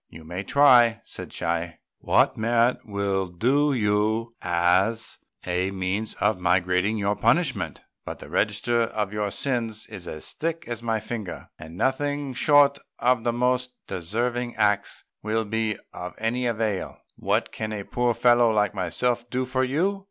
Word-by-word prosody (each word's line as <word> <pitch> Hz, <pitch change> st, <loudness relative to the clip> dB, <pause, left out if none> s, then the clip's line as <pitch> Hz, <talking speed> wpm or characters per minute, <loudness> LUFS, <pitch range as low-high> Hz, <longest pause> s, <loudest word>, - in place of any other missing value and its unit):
"You 80 Hz, -, -12 dB
may 90 Hz, +4 st, -5 dB
try," 120 Hz, -3 st, +5 dB
said -, -, -8 dB
Chi, 85 Hz, 0 st, -2 dB, 0.2 s
"what -, -, +3 dB
merit 115 Hz, +2 st, +2 dB
will 100 Hz, -2 st, -1 dB
do 130 Hz, +12 st, +2 dB
for -, -, 0 dB
you 110 Hz, +1 st, +1 dB
as 90 Hz, +6 st, +1 dB, 0.3 s
a 90 Hz, +1 st, 0 dB
means 100 Hz, +3 st, -2 dB
of 105 Hz, -1 st, +1 dB
mitigating 90 Hz, +3 st, +2 dB
your 100 Hz, 0 st, 0 dB
punishment; 115 Hz, -, +1 dB, 0.2 s
but -, -, -6 dB
the -, -, -11 dB
register 120 Hz, -1 st, +1 dB
of 105 Hz, -3 st, -2 dB
your 105 Hz, -1 st, -1 dB
sins 115 Hz, -2 st, -2 dB
is 90 Hz, -2 st, -9 dB
as 75 Hz, -, -7 dB
thick 165 Hz, +1 st, -3 dB
as 120 Hz, -2 st, -4 dB
my 115 Hz, -1 st, 0 dB
finger, 105 Hz, -4 st, -6 dB
and 80 Hz, +2 st, -10 dB
nothing 145 Hz, +3 st, -1 dB
short 140 Hz, +1 st, +4 dB, 0.2 s
of 125 Hz, -1 st, +2 dB
the 120 Hz, -, +1 dB
most 125 Hz, +1 st, 0 dB
deserving 120 Hz, +7 st, -2 dB
acts 105 Hz, -1 st, +1 dB, 0.2 s
will 110 Hz, +1 st, -1 dB
be 110 Hz, 0 st, -1 dB, 0.2 s
of 90 Hz, 0 st, -7 dB
any 120 Hz, +3 st, -1 dB
avail. 110 Hz, -4 st, -2 dB, 0.2 s
What -, -, 0 dB
can 110 Hz, -1 st, -4 dB
a 105 Hz, -2 st, -4 dB
poor 120 Hz, +2 st, 0 dB
fellow 120 Hz, 0 st, +5 dB
like 105 Hz, -2 st, +1 dB
myself 120 Hz, +6 st, -1 dB
do 130 Hz, +1 st, -1 dB
for 130 Hz, +1 st, 0 dB
you? 170 Hz, +10 st, 0 dB
110 Hz, 160 wpm, -25 LUFS, 95-125 Hz, 0.3 s, try